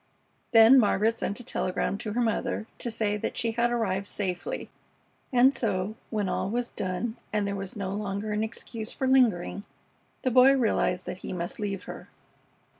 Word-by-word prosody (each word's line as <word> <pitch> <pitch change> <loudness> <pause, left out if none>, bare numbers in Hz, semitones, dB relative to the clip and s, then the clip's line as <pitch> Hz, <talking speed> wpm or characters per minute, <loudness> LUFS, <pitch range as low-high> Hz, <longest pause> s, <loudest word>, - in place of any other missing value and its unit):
Then 230 +3 +8
Margaret 220 0 +3
sent 205 -1 -3
a - - -10
telegram 190 -5 -1
to 210 - -4
her 245 - +1
mother 220 -1 -1
to 240 - -2
say 215 -2 -1
that - - -4
she 230 -1 +1
had 235 +1 +1
arrived 200 -5 -1
safely, 180 -4 -4 0.6
and 255 +2 +5
so, 200 -5 -1 0.2
when 210 -3 -1
all 190 - -1
was 240 +2 -2
done 195 +5 -3
and 210 -1 0
there 200 0 -2
was 195 -1 -5
no 195 -3 -3
longer 205 +1 -3
an 210 +1 0
excuse 220 0 -5
for 265 - -2
lingering, 230 -8 +2 0.6
the 255 - +1
Boy 255 +2 +7
realized 210 -6 +1
that 180 - -6
he - - -6
must 175 -1 -4
leave 200 -2 -3
her. - - -9
215 Hz, 180 wpm, -27 LUFS, 195-235 Hz, 0.6 s, Then